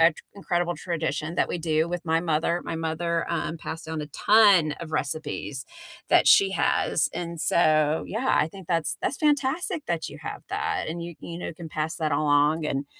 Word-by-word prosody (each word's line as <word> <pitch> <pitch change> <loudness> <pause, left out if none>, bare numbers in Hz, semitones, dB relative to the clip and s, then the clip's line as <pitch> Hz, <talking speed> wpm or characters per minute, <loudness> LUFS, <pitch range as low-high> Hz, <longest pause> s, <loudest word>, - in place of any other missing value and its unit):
a 165 +1 +7
t - - -50 0.2
incredible 175 -3 -1
tradition 165 -2 -3
that - - +2
we - - -3
do 160 0 0
with 175 -1 -4
my 165 0 +2
mother. 170 +1 0
My - - -4
mother, 165 +1 -1
um, 165 0 -2
passed 165 +1 -6
down 160 -1 -4
a 150 - -5
ton 200 -3 +5
of 165 -2 -8
recipes 145 -2 -3 0.4
that - - +5
she 395 -1 +6
has, - - +2
and 170 -1 -5
so, 155 -2 +3
yeah, 235 +5 0
I 155 - 0
think 190 +1 -12
that's 165 -2 0
that's 270 - -1
fantastic 300 +4 +1
that 170 -2 -2
you - - -10
have - - -6
that, - - -2
and 170 +2 -4
you 170 0 -7
you 170 0 -7
know, 175 - -5
can 165 0 -9
pass 155 +1 -3
that 155 -3 -1
along 150 +2 +2
and 140 -1 -2
165 Hz, 200 wpm, -25 LUFS, 155-175 Hz, 0.4 s, a